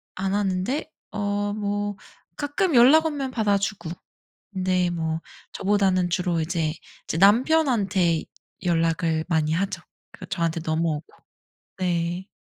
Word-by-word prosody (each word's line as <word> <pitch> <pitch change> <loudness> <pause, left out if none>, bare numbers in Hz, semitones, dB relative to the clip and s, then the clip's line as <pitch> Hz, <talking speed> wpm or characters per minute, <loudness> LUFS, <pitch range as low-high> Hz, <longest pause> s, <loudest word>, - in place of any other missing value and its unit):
안 190 +1 -2
하는데 205 +10 -1 0.2
어 205 0 -1
뭐 205 -1 -2 0.4
가끔 295 +3 0
연락 275 +7 +7
오면 280 -4 -2
받아 210 -4 +2
주고 195 -4 -3 0.6
근데 185 -1 +1
뭐 160 -1 -2 0.3
저보다는 190 -3 +2
주로 175 -1 0
이제, 160 -1 -1 0.3
이제 - - -3
남편한테 205 - +3 0.4
연락을 165 -2 +1
많이 160 -3 +1
하죠. 185 0 -1 0.3
그 - - -10
저한테 165 -2 -1
넘어오고 160 -1 -1 0.7
네. 175 0 -1
190 Hz, 235 characters per minute, -24 LUFS, 170-205 Hz, 0.7 s, 연락